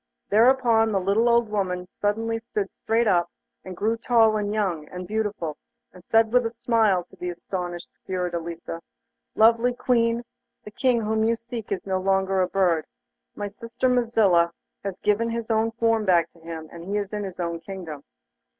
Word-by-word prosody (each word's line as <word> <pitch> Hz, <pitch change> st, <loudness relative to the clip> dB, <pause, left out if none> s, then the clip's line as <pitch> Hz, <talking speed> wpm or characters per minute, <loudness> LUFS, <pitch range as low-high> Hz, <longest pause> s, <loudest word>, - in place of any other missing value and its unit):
Thereupon 230 Hz, 0 st, +4 dB
the 195 Hz, -, +1 dB
little 200 Hz, +6 st, +2 dB
old 235 Hz, -1 st, +4 dB
woman 180 Hz, -3 st, -2 dB
suddenly 225 Hz, +2 st, 0 dB
stood 225 Hz, -3 st, -2 dB
up 195 Hz, -, -17 dB
straight, 230 Hz, +1 st, +2 dB, 0.6 s
and 185 Hz, -2 st, -8 dB
grew 225 Hz, +2 st, 0 dB
tall, 225 Hz, -2 st, +4 dB
and 205 Hz, -1 st, -1 dB
young, 185 Hz, -8 st, -1 dB
and 180 Hz, 0 st, -7 dB
beautiful, 205 Hz, -7 st, -2 dB, 0.4 s
and 180 Hz, -1 st, -15 dB
said 225 Hz, +2 st, +3 dB
with 250 Hz, 0 st, +5 dB
a 230 Hz, -, -1 dB
smile 225 Hz, -5 st, +2 dB
to 175 Hz, -, -20 dB
the 180 Hz, -, -4 dB
astonished 175 Hz, 0 st, -5 dB, 0.2 s
Fiordelisa: 170 Hz, -2 st, -4 dB, 0.5 s
'Lovely 230 Hz, +2 st, +4 dB
Queen, 235 Hz, -1 st, +1 dB, 0.4 s
the 210 Hz, -, -10 dB
King 250 Hz, 0 st, +1 dB
whom 220 Hz, 0 st, 0 dB
you 230 Hz, +1 st, +3 dB
seek 230 Hz, -1 st, -8 dB
is 195 Hz, -, -2 dB
no 190 Hz, -1 st, 0 dB
longer 190 Hz, 0 st, +2 dB
a 180 Hz, -, +2 dB
bird. 175 Hz, -5 st, +1 dB, 0.5 s
My 205 Hz, -, -3 dB
sister 230 Hz, +5 st, -3 dB
Mazilla 220 Hz, -9 st, +3 dB, 0.3 s
has 195 Hz, -2 st, -4 dB
given 210 Hz, +3 st, +1 dB
his 230 Hz, 0 st, -3 dB
own 220 Hz, +1 st, +2 dB
form 225 Hz, -1 st, +1 dB
back 175 Hz, -4 st, +3 dB
to 170 Hz, -, -20 dB
him, 160 Hz, -1 st, -7 dB
and 170 Hz, 0 st, -9 dB
he 200 Hz, +2 st, -1 dB
is 205 Hz, 0 st, -3 dB
in 210 Hz, -1 st, -2 dB
his 185 Hz, -2 st, -7 dB
own 170 Hz, -1 st, -2 dB
kingdom. 165 Hz, -4 st, -7 dB
210 Hz, 175 wpm, -25 LUFS, 180-230 Hz, 0.6 s, with